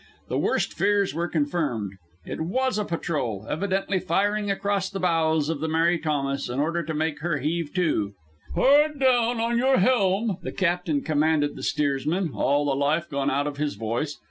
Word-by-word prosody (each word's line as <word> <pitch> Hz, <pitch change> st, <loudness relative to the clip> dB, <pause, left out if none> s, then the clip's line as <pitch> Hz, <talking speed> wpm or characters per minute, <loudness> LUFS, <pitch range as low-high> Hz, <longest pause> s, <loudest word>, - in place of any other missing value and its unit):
The -, -, 0 dB
worst -, -, 0 dB
fears 205 Hz, -1 st, +1 dB
were 170 Hz, +3 st, -1 dB
confirmed. 145 Hz, -, -1 dB, 0.3 s
It -, -, -5 dB
was 235 Hz, +7 st, 0 dB
a 210 Hz, -, -1 dB
patrol, 145 Hz, -, -3 dB
evidently 190 Hz, +4 st, -1 dB
firing 205 Hz, +5 st, 0 dB
across 195 Hz, -1 st, 0 dB
the 195 Hz, -, -5 dB
bows 160 Hz, -4 st, +2 dB
of 160 Hz, -2 st, -2 dB
the 160 Hz, -, -2 dB
Mary 165 Hz, +2 st, +2 dB
Thomas 140 Hz, -4 st, -1 dB
in 125 Hz, +2 st, -3 dB
order 165 Hz, +4 st, 0 dB
to 160 Hz, -1 st, -4 dB
make 155 Hz, 0 st, -1 dB
her 165 Hz, 0 st, -1 dB
heave 155 Hz, +2 st, -2 dB
to. 110 Hz, -, 0 dB, 0.4 s
"Hard 295 Hz, +2 st, +4 dB
down 245 Hz, -3 st, +3 dB
with 235 Hz, +1 st, +1 dB
your 265 Hz, +1 st, +3 dB
helm!" 200 Hz, -2 st, +2 dB
the -, -, -5 dB
captain 175 Hz, -5 st, 0 dB
commanded 155 Hz, -1 st, +1 dB
the -, -, -8 dB
steers 140 Hz, -2 st, 0 dB
man, 175 Hz, 0 st, 0 dB
all 145 Hz, +1 st, +1 dB
the 140 Hz, -, +1 dB
life 150 Hz, +5 st, 0 dB
gone 140 Hz, 0 st, 0 dB
out 140 Hz, +1 st, 0 dB
of 145 Hz, -1 st, -4 dB
his 150 Hz, 0 st, -2 dB
voice. 115 Hz, +8 st, -3 dB
165 Hz, 185 wpm, -25 LUFS, 145-195 Hz, 0.4 s, Hard